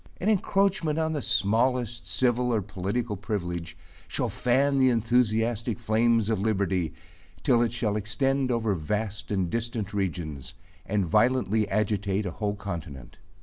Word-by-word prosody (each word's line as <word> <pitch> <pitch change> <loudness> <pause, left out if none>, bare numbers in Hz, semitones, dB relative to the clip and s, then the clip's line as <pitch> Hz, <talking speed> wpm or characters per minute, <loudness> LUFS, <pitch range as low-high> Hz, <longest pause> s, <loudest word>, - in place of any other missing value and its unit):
An 200 - 0
encroachment 195 -6 +1
on 160 0 0
the 150 - -2
smallest 115 +2 +1
civil 125 -1 +2
or 110 -4 +1
political 105 +4 -3
privilege, 85 -5 -4 0.3
shall - - -1
fan 135 +3 +2
the 130 -1 +5
enthusiastic 115 -1 +1
flames 115 -1 +2
of 110 -3 0
liberty, 95 -5 0 0.5
till 120 - +4
it 120 - +1
shall 110 -3 -1
extend 135 +6 0
over 115 -3 +1
vast 105 +5 -3
and 95 -3 0
distant 115 0 -3
regions, 85 -8 -3 0.3
and 100 -2 +1
violently 110 +2 +2
agitate 105 -1 0
a 90 - -2
whole 105 +2 -2
continent. 85 -10 -7
110 Hz, 140 wpm, -27 LUFS, 100-120 Hz, 0.5 s, the